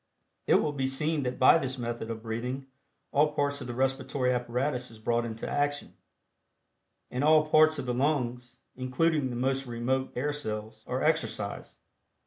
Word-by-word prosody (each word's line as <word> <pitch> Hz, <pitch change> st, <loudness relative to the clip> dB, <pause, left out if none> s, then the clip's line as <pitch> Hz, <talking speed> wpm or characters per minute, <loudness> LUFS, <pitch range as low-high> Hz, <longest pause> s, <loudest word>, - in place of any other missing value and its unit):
It -, -, +5 dB
will 150 Hz, -, +2 dB
be 135 Hz, -2 st, -1 dB
seen 150 Hz, +3 st, 0 dB
that 125 Hz, -1 st, -2 dB
by 130 Hz, +5 st, +7 dB
this 130 Hz, -2 st, -3 dB
method 120 Hz, -2 st, -4 dB
of 110 Hz, -1 st, -5 dB
breathing 125 Hz, +4 st, -3 dB, 0.5 s
all 150 Hz, +1 st, +3 dB
parts 145 Hz, -1 st, 0 dB
of 125 Hz, -, -6 dB
the 120 Hz, -, -5 dB
respiratory 130 Hz, 0 st, 0 dB
apparatus 125 Hz, +1 st, -1 dB
is 115 Hz, -, -13 dB
brought 120 Hz, +2 st, 0 dB
into 115 Hz, -1 st, -5 dB
action, 145 Hz, 0 st, -1 dB, 1.2 s
and 125 Hz, +2 st, -1 dB
all 155 Hz, 0 st, +5 dB
parts 155 Hz, 0 st, +6 dB
of 140 Hz, -, -4 dB
the 125 Hz, -, -1 dB
lungs, 125 Hz, -2 st, -1 dB, 0.2 s
including 130 Hz, +3 st, +1 dB
the 120 Hz, -, -4 dB
most 135 Hz, +2 st, 0 dB
remote 125 Hz, +3 st, -1 dB
air 145 Hz, +4 st, -1 dB
cells, 110 Hz, -5 st, -5 dB
are 130 Hz, +1 st, -1 dB
exercised. 115 Hz, -10 st, -1 dB
130 Hz, 165 wpm, -29 LUFS, 120-145 Hz, 1.2 s, by